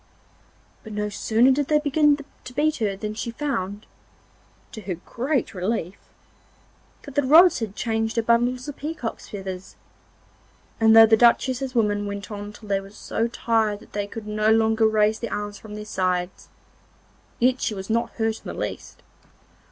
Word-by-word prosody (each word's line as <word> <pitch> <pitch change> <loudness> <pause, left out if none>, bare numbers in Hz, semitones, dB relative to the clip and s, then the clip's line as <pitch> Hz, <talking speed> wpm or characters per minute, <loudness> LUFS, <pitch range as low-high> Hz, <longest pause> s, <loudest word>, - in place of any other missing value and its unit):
But 220 - -10
no 210 0 -2
sooner 225 +5 +3
did 280 +1 +1
they 300 - +4
begin 295 0 +3 0.3
to 250 - -9
beat 305 +3 +1
her 210 -4 -1
than 210 +2 -5
she 225 +2 -4
found, 225 -6 -3 0.9
to 220 - -8
her 185 -2 -4
great 250 - -2
relief, 185 -1 -3 1.0
that 280 - -10
the 285 - +2
rods 315 +5 +6
had 215 -3 -5
changed 225 -1 -1
to 230 - +1
bundles 240 +3 +1
of 290 - -7
peacock's 295 -6 -5
feathers, 190 -2 -7 1.0
and 220 0 +6
though 225 0 +10
the 220 0 +5
Duchess's 255 +2 +2
women 205 -3 +1
went 200 0 -6
on 205 0 -6
till 210 0 -14
they 200 -1 +1
were 195 - -12
so 225 +2 -2
tired 225 -3 0
that - - -18
they 205 -1 -2
could 220 +1 -8
no 215 0 0
longer 220 0 +4
raise 215 0 +2
their 235 - -5
arms 205 0 -4
from 210 -1 -10
their 210 0 -7
sides, 185 -3 -2 0.9
yet 250 +1 +2
she 215 - -1
was 190 0 -6
not 230 +1 0
hurt 225 -1 -2
in - - -6
the - - -7
least. - - -6
220 Hz, 175 wpm, -24 LUFS, 205-245 Hz, 1.0 s, though